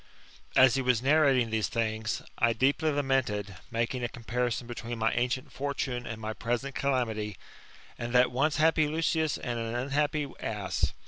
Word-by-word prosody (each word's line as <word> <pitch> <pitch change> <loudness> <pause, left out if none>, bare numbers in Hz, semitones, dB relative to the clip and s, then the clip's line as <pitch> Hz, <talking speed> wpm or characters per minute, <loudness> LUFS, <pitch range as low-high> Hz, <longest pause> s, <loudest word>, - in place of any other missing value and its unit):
As 130 -1 +7
he 135 - +1
was 125 -2 +2
narrating 135 -5 +4
these 110 -1 +1
things, 110 0 -2 0.2
I 115 0 +4
deeply 140 +7 +2
lamented, 130 -9 0
making 115 +2 -1
a 120 - -1
comparison 120 0 -2
between 120 0 -5
my 110 0 +2
ancient 125 +1 -1
fortune 135 -3 -3
and 115 -1 -5
my 110 0 -4
present 120 +5 -2
calamity, 110 -8 -1 0.6
and 120 0 -3
that 125 +1 +4
once 140 +5 +1
happy 155 0 +4
Lucius 160 0 0
and 120 -1 -3
an 115 0 -3
unhappy 145 +3 0
ass. 105 -4 -2
125 Hz, 155 wpm, -29 LUFS, 115-140 Hz, 0.6 s, As